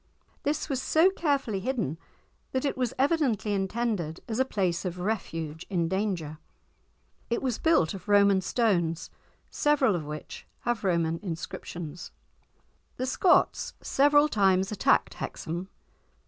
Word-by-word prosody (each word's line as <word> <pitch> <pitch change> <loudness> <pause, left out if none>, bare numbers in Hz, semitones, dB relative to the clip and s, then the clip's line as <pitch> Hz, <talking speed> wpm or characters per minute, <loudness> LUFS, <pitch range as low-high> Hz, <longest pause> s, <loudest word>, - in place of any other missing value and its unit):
This 295 +1 -1
was 270 -4 -1
so 330 +7 +4
carefully 280 - 0
hidden 205 - -2 0.5
that 260 +2 0
it 280 - 0
was 250 -3 -1
evidently 265 - +1
intended 195 -4 -1
as 225 +1 -2
a 260 - +4
place 185 -8 -1
of 180 -2 -4
refuge 165 -6 -3
in 170 -4 0
danger. 175 -5 -2 0.9
It 235 - -1
was 250 -4 -1
built 320 - +3
of 195 - -9
Roman 200 -1 +5
stones, 175 -6 0 0.4
several 280 -8 +3
of 165 - -3
which 150 +1 -8
have 240 -2 -1
Roman 165 -3 +1
inscriptions. 170 -2 -6 0.9
The 255 - -1
Scots 345 +7 +2
several 290 +2 +4
times 195 -6 +2
attacked 210 - +2
Hexham. 175 +4 -5
200 Hz, 130 wpm, -28 LUFS, 170-260 Hz, 0.9 s, Roman